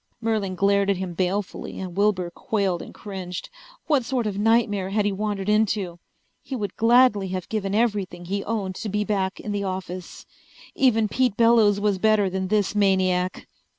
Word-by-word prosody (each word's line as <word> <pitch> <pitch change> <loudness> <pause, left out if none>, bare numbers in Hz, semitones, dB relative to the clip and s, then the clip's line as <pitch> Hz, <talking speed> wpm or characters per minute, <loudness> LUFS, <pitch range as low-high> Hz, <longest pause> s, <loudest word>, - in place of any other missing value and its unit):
Merlin 215 -5 -1
glared 200 +1 +2
at 200 - +2
him 185 -1 -4
balefully 190 +3 -3
and 185 -2 -6
Wilbur 195 -3 +1
quailed 195 -3 -1
and - - -9
cringed. 185 -4 -7 0.3
What 295 -5 +2
sort 245 -1 -1
of 200 -2 -2
nightmare 210 -3 +2
had 205 +1 0
he 205 - +2
wandered 200 -1 -3
into? 210 -4 +1 0.4
He 270 - -6
would 210 -5 -4
gladly 230 -3 +4
have 185 -1 -4
given 200 -2 -2
everything 200 -6 -1
he 200 +3 -2
owned 205 -4 -2
to 215 0 -4
be 210 +1 0
back 195 -2 -1
in 210 - -5
the 205 -1 -2
office. 185 -2 -6 0.5
Even 225 -5 +3
Pete 245 -1 0
Bellows 230 -3 +5
was 200 -2 +1
better 215 -2 +3
than 190 0 -2
this 205 0 +1
maniac! 185 -3 +1
200 Hz, 175 wpm, -24 LUFS, 190-215 Hz, 0.5 s, Bellows